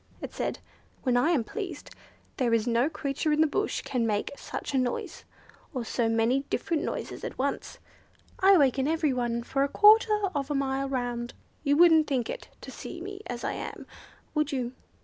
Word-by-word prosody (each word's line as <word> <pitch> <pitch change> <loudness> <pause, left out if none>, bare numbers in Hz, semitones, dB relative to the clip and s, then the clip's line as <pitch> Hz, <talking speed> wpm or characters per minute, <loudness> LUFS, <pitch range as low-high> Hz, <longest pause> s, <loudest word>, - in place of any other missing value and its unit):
it - - -7
said; - - -2 0.5
"when 250 -2 +2
I 245 +6 +3
am 305 -9 +2
pleased 390 - -6 0.5
there 240 -4 +2
is 225 -1 +1
no 240 +4 +2
creature 300 0 -2
in 300 - +2
the - - +6
bush 360 +7 -1
can 240 -3 -1
make 210 -1 -1
such 280 - -6
a 265 - +3
noise, 250 -1 -3 0.5
or 245 -2 -2
so 230 0 0
many 225 +4 +2
different 330 -3 -1
noises - - -4
at - - -5
once. 275 +2 -2 0.6
I 385 0 +7
waken 270 -2 +3
every 315 -3 +1
one 240 -1 -1
for 275 +3 -1
a 280 - 0
quarter 425 +2 +6
of 280 -2 -2
a 295 - 0
mile 275 0 -1
round. 245 -2 -3 0.3
You 285 -1 +3
wouldn't 325 -2 +6
think 260 -4 -1
it, - - -7
to - - -9
see 345 - -8
me 395 +3 -7
as 240 -1 -5
I - - -1
am, - - -6 0.5
would 300 -2 0
you?" 250 -3 -2
275 Hz, 190 wpm, -28 LUFS, 245-315 Hz, 0.6 s, I